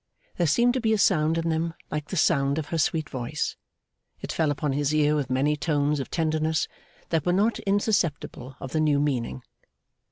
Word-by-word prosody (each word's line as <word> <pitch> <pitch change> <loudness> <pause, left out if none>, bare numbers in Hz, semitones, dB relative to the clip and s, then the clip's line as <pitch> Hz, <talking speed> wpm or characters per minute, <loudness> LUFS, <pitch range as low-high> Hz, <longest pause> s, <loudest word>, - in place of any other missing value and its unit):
There 175 - +2
seemed 240 +11 +3
to 260 - -1
be 220 -1 +2
a - - +2
sound 160 -4 +3
in 165 0 -1
them 165 +1 -1 0.2
like 150 -1 -3
the 190 - -4
sound 140 -3 +2
of 155 -2 -3
her 165 - -1
sweet 155 0 +1
voice. 130 +3 -3 0.6
It - - -5
fell 160 -2 +1
upon 145 -1 -1
his 145 +2 0
ear 150 0 +3
with 140 -4 -1
many 135 +4 +2
tones 150 -1 0
of 135 - -4
tenderness, 160 -1 0 0.4
that 165 -2 +1
were 175 - +1
not 210 +5 +2
insusceptible 175 - 0
of 130 - -7
the 155 - 0
new 150 -2 +3
meaning. 130 -3 -1
155 Hz, 195 wpm, -26 LUFS, 145-165 Hz, 0.6 s, seemed